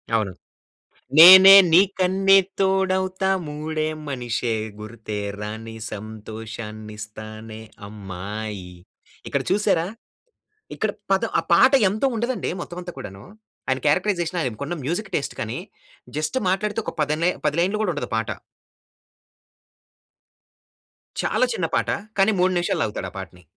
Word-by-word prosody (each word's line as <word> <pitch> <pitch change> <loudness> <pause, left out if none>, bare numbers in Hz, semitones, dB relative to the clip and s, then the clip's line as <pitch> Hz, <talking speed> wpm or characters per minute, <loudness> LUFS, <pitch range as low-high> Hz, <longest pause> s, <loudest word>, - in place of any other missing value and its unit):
అవును. 105 -4 0 0.9
నేనే 190 +3 +11 0.2
నీకన్నీ 195 +1 +4 0.2
తోడవుతా 190 0 +1 0.2
మూడే 155 +1 -3 0.2
మనిషే 120 -3 -2 0.3
గుర్తే 110 -1 -7 0.2
రాని 110 +2 -7 0.2
సంతోషాన్నిస్తానే 110 0 -8 0.3
అమ్మాయి. 100 -1 -7 0.5
ఇక్కడ - - -1
చూసారా? 195 -4 +2 0.9
ఇక్కడ - - -1 0.2
పదం - - +1
ఆ - - -2
పాట 260 - +6 0.2
ఎంతో 215 +7 0
ఉండదండి 240 +2 -2
మొత్తం 175 +1 -7
అంతా 175 0 -7
కూడాను. 95 -5 -9 0.4
ఆయన 130 -1 0
క్యారెక్టరైజేషన్ 175 +1 0
ఆయనకున్న 140 +6 -4
మ్యూజిక్ 185 +7 -3
టేస్ట్ 140 - -3
కానీ 110 0 -4 0.6
జస్ట్ 155 +10 -2
మాట్లాడితే 210 +3 -1
ఒక - - -4
పది 150 +1 0
లై 180 - +3 0.2
10 150 +1 -1
లైన్‌లు 195 +4 0
కూడా 195 - 0
ఉండదు 145 - -5
ఆ - - -4
పాట. 110 0 -2 2.9
చాలా - - +2
చిన్న - - -1
పాట. - - 0 0.3
కానీ 195 +3 +5
3 185 +1 +3
నిమిషాలు 175 - -1
లాగుతాడు 100 -3 -4
ఆ - - -26
పాటని. 90 -1 -10
145 Hz, 120 wpm, -23 LUFS, -, 2.9 s, నేనే